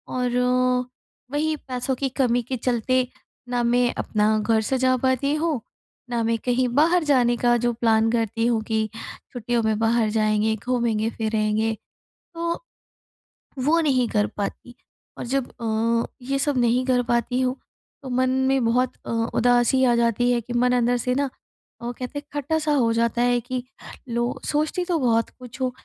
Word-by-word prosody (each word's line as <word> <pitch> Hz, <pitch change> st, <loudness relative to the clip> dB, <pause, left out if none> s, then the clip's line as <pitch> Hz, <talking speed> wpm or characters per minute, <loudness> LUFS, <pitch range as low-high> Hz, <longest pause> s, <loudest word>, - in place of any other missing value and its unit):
और 250 Hz, -1 st, 0 dB, 0.9 s
वही 310 Hz, +2 st, 0 dB
पैसों 260 Hz, -1 st, -3 dB
की 270 Hz, +1 st, -2 dB
कमी 245 Hz, -1 st, +2 dB
के 260 Hz, +2 st, -4 dB
चलते 250 Hz, +2 st, +1 dB, 0.4 s
ना 245 Hz, -1 st, 0 dB
मैं 245 Hz, +1 st, +2 dB
अपना 215 Hz, 0 st, +1 dB
घर 220 Hz, +1 st, +2 dB
सजा 255 Hz, +2 st, +1 dB
पाती 260 Hz, +2 st, +1 dB
हूँ, 310 Hz, -3 st, 0 dB, 0.5 s
ना 235 Hz, -1 st, -1 dB
मैं 230 Hz, 0 st, +1 dB
कहीं 250 Hz, 0 st, +2 dB
बाहर 335 Hz, +4 st, +4 dB
जाने 245 Hz, -5 st, +3 dB
का 240 Hz, 0 st, +3 dB
जो 240 Hz, 0 st, 0 dB
प्लान 225 Hz, -1 st, +2 dB
करती 230 Hz, -1 st, 0 dB
हूँ 230 Hz, -2 st, +1 dB
कि 220 Hz, -1 st, 0 dB
छुट्टियों 235 Hz, +1 st, -4 dB
में 220 Hz, -1 st, +1 dB
बाहर 225 Hz, -1 st, +2 dB
जाएँगे, 215 Hz, 0 st, +1 dB
घूमेंगे-फिरेंगे 220 Hz, -1 st, 0 dB, 0.6 s
तो 335 Hz, +5 st, -3 dB, 1.0 s
वो 320 Hz, +5 st, +3 dB
नहीं 260 Hz, -6 st, +2 dB
कर 210 Hz, 0 st, +1 dB
पाती। 220 Hz, +4 st, -5 dB, 0.4 s
और -, -, -5 dB
जब 265 Hz, +1 st, -1 dB
अ, 230 Hz, +1 st, +1 dB, 0.2 s
ये 275 Hz, +2 st, -2 dB
सब 285 Hz, -1 st, 0 dB
नहीं 245 Hz, +1 st, +2 dB
कर 255 Hz, -1 st, +2 dB
पाती 240 Hz, +1 st, 0 dB
हूँ 255 Hz, 0 st, 0 dB, 0.5 s
तो 265 Hz, -, -6 dB
मन 255 Hz, +1 st, +1 dB, 0.2 s
में 270 Hz, -1 st, +2 dB
बहुत 245 Hz, +2 st, +1 dB
अ, -, -, -7 dB, 0.3 s
उदासी 245 Hz, +2 st, +3 dB
आ 240 Hz, -, +4 dB
जाती 235 Hz, +1 st, +2 dB
है 240 Hz, -, +2 dB
कि 240 Hz, +2 st, -7 dB
मन 250 Hz, +1 st, +2 dB
अंदर 245 Hz, 0 st, +2 dB
से 250 Hz, +1 st, -1 dB
ना 280 Hz, 0 st, 0 dB, 0.5 s
वो 240 Hz, +1 st, -3 dB
कहते 255 Hz, +4 st, -5 dB
हैं 290 Hz, -, -13 dB
खट्टा-सा 300 Hz, +2 st, -1 dB
हो 235 Hz, -5 st, +2 dB
जाता 235 Hz, +1 st, +1 dB
है 245 Hz, 0 st, +3 dB
कि 250 Hz, +1 st, -4 dB, 0.5 s
लो 235 Hz, 0 st, 0 dB, 0.2 s
सोचती 310 Hz, +4 st, 0 dB
तो 350 Hz, -2 st, 0 dB
बहुत 230 Hz, -3 st, +2 dB
कुछ 250 Hz, +1 st, -11 dB
हूँ 255 Hz, -, +1 dB
245 Hz, 165 wpm, -23 LUFS, 230-260 Hz, 1.0 s, बाहर